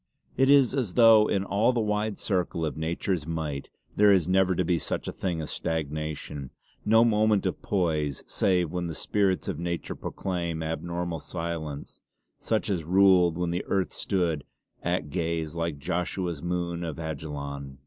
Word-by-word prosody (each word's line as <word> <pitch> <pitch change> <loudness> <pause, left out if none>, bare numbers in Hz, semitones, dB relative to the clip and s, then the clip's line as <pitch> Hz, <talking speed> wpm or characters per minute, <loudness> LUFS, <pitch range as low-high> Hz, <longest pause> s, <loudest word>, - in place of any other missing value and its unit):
It 135 +1 +3
is 140 -3 +6
as 125 -10 -1
though 115 -3 +7
in 100 - +1
all 105 +5 +2
the 120 - 0
wide 105 -1 0
circle 90 -4 -1
of 75 - -3
nature's 80 +1 -2
might 80 -4 -3 0.3
there 105 0 +6
is 95 -5 +3
never 95 0 +3
to 90 - 0
be 85 -1 +1
such - - -3
a - - -2
thing 90 -4 -3
as 75 - -5
stagnation; 75 -3 -3 0.3
no 115 +2 +5
moment 110 -3 +3
of 95 - -2
poise, 80 -8 0
save 90 -4 +1
when 90 -1 -2
the 80 - -5
spirits 100 0 0
of - - -3
nature 85 0 -3
proclaim 85 -4 -3
abnormal 85 +1 -3
silence, 80 -4 -5 0.4
such 110 -1 0
as 95 -6 -1
ruled 90 -1 +5
when 90 -1 -1
earth 95 -2 0
stood 85 -6 -1 0.4
"at 75 -1 -1
gaze, 80 -2 -2
like 85 -3 -2
Joshua's 85 +1 -2
moon 85 -1 -2
on 80 -3 -4
Ajalon." 70 -3 -5
85 Hz, 160 wpm, -27 LUFS, 80-95 Hz, 0.4 s, though